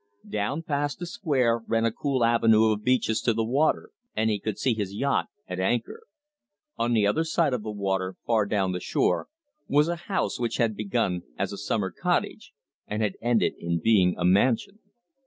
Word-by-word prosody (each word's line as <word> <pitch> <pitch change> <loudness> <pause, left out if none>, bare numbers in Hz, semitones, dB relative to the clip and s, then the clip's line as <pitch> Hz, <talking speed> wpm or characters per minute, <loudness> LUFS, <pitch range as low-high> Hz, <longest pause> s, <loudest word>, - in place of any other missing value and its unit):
Down 105 +10 -2
past 145 -1 -1
the 175 - -5
square 140 - +1
ran 115 0 +1
a 115 - +2
cool 130 0 0
avenue 110 -1 +4
of 105 0 -2
beeches 125 -3 +1
to 115 - +2
the 115 - +1
water, 135 +7 +1 0.2
and 110 0 +1
he 105 - -1
could 105 0 -4
see 125 +3 +1
his 100 -3 -4
yacht 140 +6 0 0.2
at 90 - -5
anchor. 120 - -2 0.7
On 120 +1 0
the 110 -3 +3
other 105 +11 +2
side 160 -3 +1
of 125 - -1
the 110 - -6
water, 95 -2 -2
far 110 -3 +2
down 100 -3 0
the 90 - -3
shore, - - 0 0.4
was 150 +2 +3
a 170 - -1
house 190 -9 -1
which 120 -1 -1
had 115 -2 +1
been 105 +1 -5
begun 90 -2 0 0.2
as - - -2
a - - -4
summer - - -1
cottage, - - -2 0.4
and 105 +1 -2
had 105 -3 -1
ended 120 -1 +2
in 85 0 -1
being 95 -2 +3
a 90 - -1
mansion. 115 - +2
115 Hz, 195 wpm, -26 LUFS, 100-130 Hz, 0.7 s, avenue